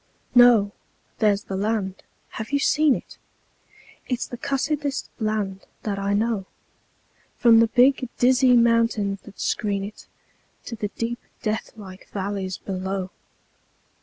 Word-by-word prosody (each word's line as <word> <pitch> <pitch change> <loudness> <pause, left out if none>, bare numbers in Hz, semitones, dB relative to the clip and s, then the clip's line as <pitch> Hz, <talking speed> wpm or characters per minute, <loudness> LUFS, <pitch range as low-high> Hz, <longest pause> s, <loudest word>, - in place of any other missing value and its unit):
No! 240 -5 +6 0.5
There's 205 -1 +2
the 195 - -5
land. 200 -1 -2 0.3
(Have 220 +3 -7
you 285 - +3
seen 295 -1 +3
it?) - - -10 0.9
It's 250 -1 -1
the - - -7
cussedest 285 +2 -2
land 210 -3 -2 0.2
that 200 -2 -2
I 200 +1 0
know, 215 -2 0 0.9
From 230 -2 +6
the 230 - +5
big, 255 +2 +3
dizzy 255 0 +5
mountains 230 -4 +2
that 210 - -14
screen 200 -3 -1
it 205 +2 -9 0.6
To 235 - -5
the 210 -1 -3
deep, 235 +3 -4 0.2
deathlike 210 -3 -5
valleys 195 -1 -3
below. 190 0 -4
215 Hz, 125 wpm, -24 LUFS, 200-245 Hz, 0.9 s, No